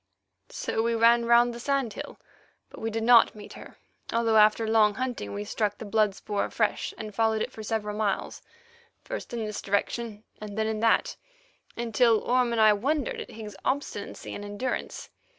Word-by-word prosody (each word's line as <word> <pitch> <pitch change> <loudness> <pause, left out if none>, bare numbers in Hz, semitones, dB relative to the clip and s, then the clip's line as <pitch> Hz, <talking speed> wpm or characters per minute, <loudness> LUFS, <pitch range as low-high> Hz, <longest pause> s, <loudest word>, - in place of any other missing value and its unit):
So - - -2
we 230 +1 0
ran 235 +1 +4
round 235 +1 +4
the 235 - -8
sand 275 -3 -1
hill, - - -8 0.5
but - - -11
we 225 - -1
did 225 0 -3
not 235 -1 +6
meet 210 -1 -11
her, - - -12 0.3
although 230 -1 +2
after 215 +1 +5
long 215 -2 +4
hunting 245 - -4
we 100 +1 -4
struck 205 - -2
the 225 - -8
blood 210 -1 +1
spoor 205 0 -2
afresh, 215 -2 -1
and 215 -1 -7
followed 220 +1 +1
it - - -5
for 220 - -9
several 210 -1 -3
miles, 210 -2 -2 0.6
first - - -6
in 230 -2 -3
this 210 -1 -5
direction, 210 +2 -2 0.2
and 210 -1 -8
then 220 - +1
in 220 0 -2
that, 225 0 +2 0.6
until 230 -1 +3
Orme 250 -1 +1
and 230 - 0
I 215 -1 +7
wondered 275 +6 -1
at - - -9
Higgs's 215 -3 -9
obstinacy 260 -7 -3
and 205 - -6
endurance. 205 +5 -4
220 Hz, 185 wpm, -27 LUFS, 210-235 Hz, 0.6 s, I